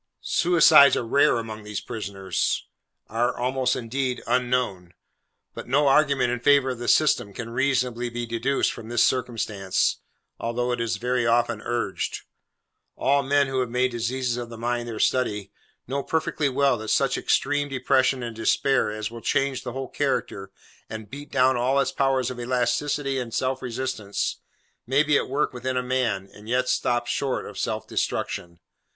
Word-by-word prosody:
Suicides 165 -6 +6
are 120 - -2
rare 140 +3 +3
among 110 -2 -5
these 105 0 -5
prisoners: 100 -5 -2 0.4
are 120 +3 0
almost, 125 0 0
indeed, 125 +1 -3
unknown. 120 -9 -1 0.6
But - - -8
no 140 +3 +3
argument 135 -3 +3
in 125 - -2
favour 135 +1 +4
of 125 - -6
the 120 - -5
system, 145 -9 +3
can 115 -1 -6
reasonably 125 -1 0
be 120 0 -4
deduced 115 +4 0
from 110 - -10
this 120 -1 +3
circumstance, 110 -6 0 0.4
although 120 +2 -1
it 120 -1 -1
is 115 -1 -1
very 125 -1 0
often 115 -2 +1
urged. 120 -5 -2 0.7
All 140 +1 +2
men 140 +1 +2
who 135 -1 -2
have 125 -2 -1
made 125 +1 +1
diseases 120 +1 -2
of 120 -1 -5
the 115 - -9
mind 120 +1 -2
their 115 -2 -5
study, 105 -7 0 0.3
know 140 +3 -2
perfectly 155 -1 -1
well 135 -2 +2
that 110 - -7
such - - +2
extreme 145 +1 0
depression 130 -1 +1
and 115 -1 -5
despair 125 +2 +2
as 110 +1 -4
will 115 0 -9
change 135 +1 0
the 125 - -6
whole 135 0 -4
character, 120 -9 -2 0.4
and 110 -1 -8
beat 145 +1 -9
down 130 -1 +3
all 130 +3 +2
its 140 - +1
powers 135 -2 +1
of 125 - -7
elasticity 135 +3 0
and 115 -3 -5
self 130 0 -1
resistance, 120 -4 -3 0.5
may 135 +4 +3
be 150 -1 +2
at - - +1
work 140 +1 0
within 130 +1 -3
a 125 - 0
man, 125 -7 -1
and 105 +2 -13
yet 125 +1 +1
stop 120 -1 +1
short 135 +1 -2
of - - -8
self - - -2
destruction. 85 -1 -3
125 Hz, 170 wpm, -25 LUFS, 115-135 Hz, 0.7 s, Suicides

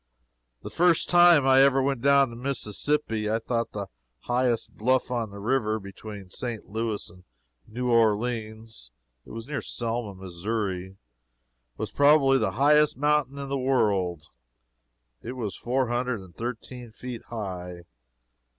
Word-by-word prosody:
The - - -7
first 175 -1 +2
time 175 -5 +6
I 135 0 +6
ever 135 0 +5
went 135 -2 0
down 140 -1 +4
the - - -9
Mississippi, 120 -2 -1
I 110 - +1
thought 115 0 -2
the 100 -1 -4 0.4
highest 120 -1 0
bluff 130 +3 +1
on 115 -3 -1
the 100 - -11
river 110 0 0
between 100 -1 -10
St. 120 -1 -5
Louis 110 0 -3
and 90 +1 -18 0.4
New 125 +2 -2
Orleans 110 - 0 0.4
it - - -13
was 115 0 -7
near 145 +1 -4
Selma, 115 -3 -3
Missouri 95 0 -4 0.8
was - - -4
probably 140 -2 +5
the 95 - 0
highest 150 +5 +4
mountain 145 -1 +1
in 140 -1 -5
the 140 0 -1
world. 100 - +1 1.0
It 125 - -6
is 115 -6 -4
four 125 0 -1
hundred 120 -2 -1
and 95 -2 -15
thirteen 120 +1 -6
feet 120 +1 -8
high. 90 -6 -6
115 Hz, 140 wpm, -26 LUFS, 105-135 Hz, 1.0 s, time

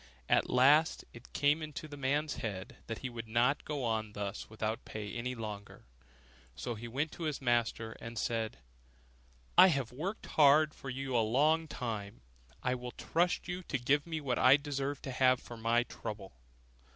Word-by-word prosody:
At - - +3
last 145 +5 +4
it 120 +1 -13
came 145 +2 +2
into 155 0 -6
the 145 - -9
man's 145 +2 0
head 100 -4 -5
that 115 - -4
he - - -1
would 115 -1 -6
not 120 +6 +2
go 145 -3 -3
on 110 -2 -1
thus 100 0 -5
without 110 0 -3
pay 105 -2 -6
any 125 +2 -3
longer; 105 -3 -7 0.7
so 65 - -4
he 115 +1 -7
went 140 +7 -2
to 170 - -6
his 150 -3 -2
master, 120 -3 0
and 115 0 -7
said, 110 - -1 1.0
'I - - +11
have 135 -9 0
worked 180 - -4
hard 150 +1 +5
for 135 - -8
you 135 0 -3
a 115 - +5
long 150 +9 +3
time, 110 -6 -5 0.4
I 125 - +1
will 125 -1 -5
trust 175 +2 0
to 175 - -5
you 180 +1 -4
to 130 - -1
give 145 +5 +1
me 160 -1 -2
what 130 -4 -1
I 130 +2 +7
deserve 140 -1 -3
to 135 - -4
have 130 0 +4
for 120 - -10
my 115 +1 +2
trouble. 105 -5 -7
125 Hz, 185 wpm, -33 LUFS, 115-145 Hz, 1.0 s, I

